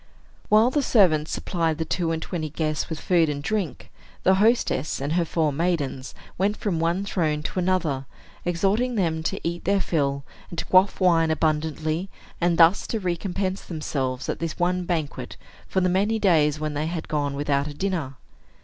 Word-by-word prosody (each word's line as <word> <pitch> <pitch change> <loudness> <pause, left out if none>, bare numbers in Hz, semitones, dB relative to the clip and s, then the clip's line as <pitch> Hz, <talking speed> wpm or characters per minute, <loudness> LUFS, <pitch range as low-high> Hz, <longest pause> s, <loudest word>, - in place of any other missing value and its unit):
While 220 +4 +5
the 290 - +1
servants 175 - +3
supplied 165 -4 -1
the 160 - -2
two 165 0 -1
and 165 - -1
twenty 160 -1 -4
guests 155 0 -2
with 160 -2 -4
food 170 -2 +2
and 145 -1 -3
drink, 205 -4 -3 0.3
the 190 - +5
hostess 205 - +2
and 140 +3 -2
her 175 0 +2
four 155 -2 0
maidens 145 -5 -2 0.2
went 205 +3 +1
from 185 -6 -1
one 170 +4 0
throne 155 -6 -1
to 185 - -3
another, 170 -8 0 0.4
exhorting 200 +8 +1
them 165 -6 0
to 160 - -2
eat 170 +1 -4
their 200 +1 +2
fill, 140 -6 0 0.3
and 170 - -8
to - - -2
quaff 185 +2 +4
wine 170 -3 +4
abundantly, 160 +2 -1 0.3
and 170 -1 +2
thus 170 +4 +5
to 225 - -2
recompense 185 +1 -2
themselves, 135 -5 -3
at - - -3
this 165 -2 -3
one 180 +1 0
banquet, 165 -5 -3 0.3
for 190 - 0
the 185 - +3
many 200 +5 +1
days 155 -7 +3
when 155 -1 -2
they 150 +2 -2
had 165 -1 -4
gone 145 -2 -1
without 140 0 0
a 150 - -6
dinner. 165 -7 -2
165 Hz, 180 wpm, -24 LUFS, 155-185 Hz, 0.4 s, While